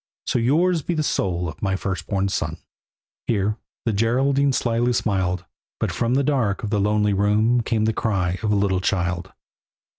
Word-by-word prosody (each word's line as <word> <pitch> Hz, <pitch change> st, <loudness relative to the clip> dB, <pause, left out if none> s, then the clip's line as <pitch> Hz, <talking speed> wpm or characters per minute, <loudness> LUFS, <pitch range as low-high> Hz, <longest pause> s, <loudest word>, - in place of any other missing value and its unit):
"So -, -, 0 dB
yours 165 Hz, +8 st, +2 dB
be 170 Hz, +4 st, -2 dB
the 155 Hz, -, 0 dB
soul 90 Hz, -9 st, -1 dB
of 80 Hz, -, -8 dB
my 95 Hz, -2 st, 0 dB
firstborn 95 Hz, +1 st, -2 dB
son." 95 Hz, -, -2 dB, 0.7 s
Here 105 Hz, -1 st, 0 dB, 0.3 s
the 115 Hz, -, +1 dB
Geraldine 135 Hz, +6 st, +2 dB
slyly 120 Hz, -1 st, +1 dB
smiled, 95 Hz, -5 st, 0 dB, 0.3 s
But -, -, 0 dB
from 120 Hz, +1 st, 0 dB
the 140 Hz, -, +2 dB
dark 125 Hz, -9 st, 0 dB
of 105 Hz, -, -3 dB
the 105 Hz, -2 st, +1 dB
lonely 105 Hz, 0 st, +2 dB
room 105 Hz, +4 st, +2 dB
Came 110 Hz, -1 st, 0 dB
the 110 Hz, -, +1 dB
cry 95 Hz, -5 st, -1 dB
of 110 Hz, -, 0 dB
a -, -, +3 dB
little 100 Hz, -2 st, +1 dB
child. 90 Hz, -1 st, -1 dB
105 Hz, 175 wpm, -23 LUFS, 95-120 Hz, 0.7 s, a